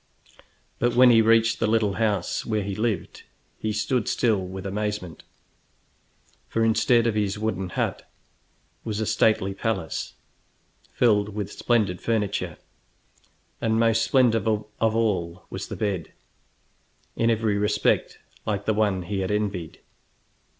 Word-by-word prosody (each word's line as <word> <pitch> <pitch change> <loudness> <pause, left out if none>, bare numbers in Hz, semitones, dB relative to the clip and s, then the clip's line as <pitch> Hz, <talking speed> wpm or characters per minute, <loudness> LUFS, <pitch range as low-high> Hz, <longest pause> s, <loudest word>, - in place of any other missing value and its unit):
But 120 0 +1
when 125 0 +7
he 115 -1 +6
reached 115 0 +3
the - - +1
little 110 -2 +2
house 105 -3 0
where 110 -2 -1
he 100 0 -4
lived, 105 -3 -2 0.4
he 110 - -2
stood 105 +2 -1
still 110 -5 +1
with 95 +1 -7
amazement, 105 -3 -3 1.3
for 115 0 +1
instead 115 +1 +3
of 115 - +2
his 105 -1 -1
wooden 95 -4 -2
hut - - -3 0.7
was 110 -2 -3
a 110 - 0
stately 105 -2 +2
palace 95 -5 -3 0.8
filled 105 -3 +2
with 105 -2 -4
splendid 105 -7 0
furniture, 105 -3 -1 1.0
and 110 0 +1
most 115 -1 +3
splendid 115 -5 +3
of 105 -1 -1
all 105 -6 0
was - - -5
the - - -6
bed, 100 -6 -2 1.0
in 115 - +2
every 110 -2 +1
respect 105 0 +1 0.3
like 100 -1 -2
the 110 - +2
one 100 -4 +1
he 100 +2 -3
had 95 - -2
envied. 100 -5 -3
105 Hz, 135 wpm, -25 LUFS, 100-115 Hz, 1.3 s, when